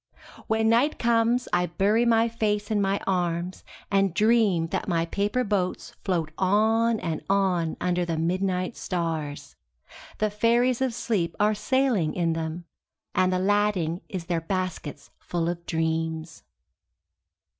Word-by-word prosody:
When 220 -1 +1
night 240 +7 +3
comes 235 +1 +2
I 175 0 +2
bury 205 +7 +2
my 230 -1 +4
face 215 -2 -1
in 210 -1 +2
my 195 0 +1
arms 175 -1 -1 0.3
and 195 -3 +2
dream 210 -6 +3
that - - -3
my 165 -3 +1
paper 205 +8 0
boats 195 -5 -2
float 170 -5 -1
on 220 +4 +3
and 160 -3 -3
on 185 -5 +1
under 180 0 0
the 165 -2 -2
midnight 185 +4 -1
stars. 155 -6 -4 0.6
The 215 -1 0
fairies 235 +4 +2
of 260 -3 0
sleep 210 -8 -1
are 210 +1 +3
sailing 230 - +1
in 170 -2 +1
them, 165 +1 -4 0.5
and 185 0 +2
the 185 - +1
lading 190 -3 +1
is 185 -6 -5
their 170 -2 -1
baskets 185 -4 -4
full 170 -1 -2
of 170 0 -3
dreams. 160 0 -2
185 Hz, 140 wpm, -26 LUFS, 170-220 Hz, 0.6 s, my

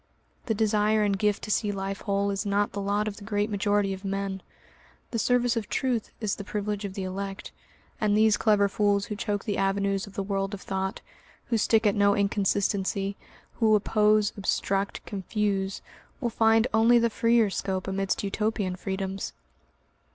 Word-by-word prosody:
The 220 - +1
desire 215 0 +2
and 200 -1 +2
gift 205 +1 0
to 215 - -3
see 210 0 +1
life 195 0 -4
whole 200 0 0
is 195 0 -2
not 205 0 +1
the 200 - -4
lot 205 +2 0
of 205 - -4
the 205 - -10
great 205 +1 -1
majority 205 -1 +1
of 190 +1 -8
men, 195 -1 -3 0.7
the 230 - -1
service 245 +1 +2
of 225 -3 -3
truth 245 -4 -1
is 210 -3 -1
the 200 - -7
privilege 205 0 -3
of 195 -1 -6
the 195 - -3
elect, 195 +1 -5 0.5
and 210 -1 +3
these 215 -1 +5
clever 210 -2 +3
fools 205 0 +1
who 210 - -5
choke 205 -1 -2
the 205 -3 -1
avenues 195 0 0
of 200 - -12
the 200 - -1
world 195 0 -2
of 190 - -12
thought, 190 +2 -3 0.5
who 230 - +2
stick 225 +1 +3
at 205 - +4
no 200 0 +3
inconsistency, 200 -1 0 0.4
who 220 -2 +5
oppose, 210 0 +3
obstruct, 195 0 -1
confuse, 195 -1 -2 0.4
will 240 -4 -1
find 225 0 +4
only 225 +2 +5
the 235 -1 +2
freer 230 -2 +3
scope 190 -1 -2
amidst 195 +1 -1
Utopian 205 -2 -1
freedoms. 190 +1 -4
205 Hz, 175 wpm, -27 LUFS, 195-215 Hz, 0.7 s, these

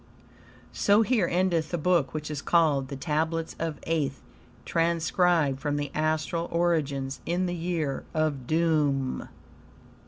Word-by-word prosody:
So 205 +2 +4
here 220 -6 +2
endeth 175 -2 +1
the 175 - -1
Book 170 -4 +2
which 155 0 -5
is 145 -2 -4
called 150 -6 +2
"The 140 - -6
Tablets 160 +3 -1
of 160 -3 -3
Aeth," 155 -4 0 0.5
transcribed 165 -3 +2
from 145 0 -1
the 145 -1 -3
astral 155 +2 -1
originals 150 -6 0
in 175 +2 0
the 175 - -2
Year 165 -5 -2
of 150 -5 -1
Doom 150 -5 +1
MDCCCXCIII. - - -9
160 Hz, 135 wpm, -27 LUFS, 145-170 Hz, 0.5 s, So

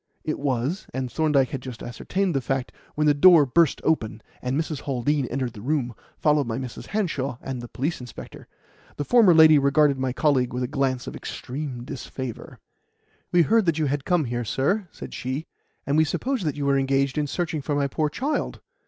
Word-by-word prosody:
It 155 - -3
was; 140 +5 -1
and 130 -2 -3
Thorndyke 150 -5 +2
had 135 - -4
just 125 -3 -8
ascertained 185 +9 -2
the 135 - 0
fact 130 +1 -2 0.2
when 150 - +1
the 150 - +5
door 160 +1 +7
burst 160 +3 +3
open 110 -9 0 0.2
and 130 +3 -1
Mrs. 155 -3 -3
Haldean 135 +1 0
entered 125 -2 -3
the 105 - -10
room, 130 -1 -1 0.2
followed 150 -4 +2
by 115 0 -2
Mrs. 130 -2 -7
Hanshaw 150 - -2
and 130 -2 -5
the 120 - -7
police 140 +5 -3
inspector. 125 -2 -10 0.5
The 145 - -3
former 230 - +6
lady 160 -2 +8
regarded 140 0 +3
my 130 -1 0
colleague 130 -3 +1
with 125 +1 -2
a - - -1
glance 135 -2 -1
of - - -7
extreme 130 -2 -6
disfavour. 130 -2 -7 0.7
"We 175 -1 +5
heard 220 +3 +3
that 165 -2 +2
you 155 - +1
had 140 0 -1
come 175 -3 +1
here, 120 0 -2
sir," 180 - 0
said - - -10
she, 130 +5 -4 0.4
"and 140 +2 +1
we 155 - +6
supposed 175 - -2
you 145 - -2
were 140 0 +3
engaged 135 0 +1
in 150 - 0
searching 165 0 -2
for 145 +1 -2
my 145 -1 +1
poor 150 +2 0
child. 280 - -2
140 Hz, 195 wpm, -24 LUFS, 130-155 Hz, 0.7 s, lady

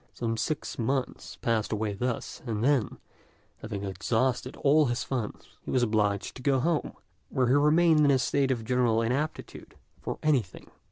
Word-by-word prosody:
Some 115 -1 -2
six 145 +6 -3
months 130 +3 -2
passed 115 -2 0
away 105 -1 -1
thus, 125 +8 -3
and 110 -1 -2
then, 135 -3 +1 0.6
having 105 -3 -5
exhausted 120 +7 -1
all 150 +1 +3
his 120 0 -1
funds, 125 -6 -4 0.2
he - - -10
was 130 -2 +2
obliged 105 -3 0
to - - -10
go 135 0 +2
home, 160 +3 0 0.4
where 130 -3 +1
he - - +4
remained 155 +3 +4
in 150 -1 +5
a 135 - +5
state 135 +1 +1
of 120 -4 -1
general 120 -2 +2
inaptitude 140 +7 -3 0.3
for - - -4
anything. 130 - -1
125 Hz, 165 wpm, -28 LUFS, 110-140 Hz, 0.6 s, in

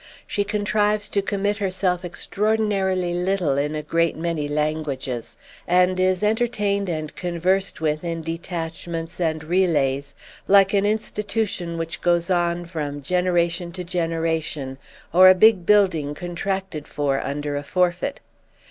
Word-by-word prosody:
She 205 - -1
contrives 210 0 0
to 200 - +1
commit 205 +1 -1
herself 185 -2 0
extraordinarily 195 -1 0
little 180 -4 0
in 145 +2 -1
a 150 - -3
great 165 +1 +1
many 165 -3 -2
languages, 145 -5 -3 0.3
and 180 +1 +3
is 185 +1 +2
entertained 210 -3 +1
and 155 -2 -4
conversed 180 +1 -1
with 155 0 0
in 165 -1 -3
detachments 165 0 -5
and 160 -3 -1
relays, 145 -6 +1 0.3
like 195 0 +5
an 200 0 +3
institution 210 -4 -2
which 165 0 -4
goes 175 +1 +2
on 175 -1 +1
from 145 -4 -5
generation 175 +1 0
to 180 0 -5
generation 165 -5 -2 0.3
or 185 +2 +9
a 185 - +7
big 195 -2 +5
building 185 -9 +3
contracted 180 -1 -4
for 140 -2 -1
under 145 +1 -3
a 145 - -2
forfeit. 180 - 0
175 Hz, 130 wpm, -23 LUFS, 160-195 Hz, 0.3 s, or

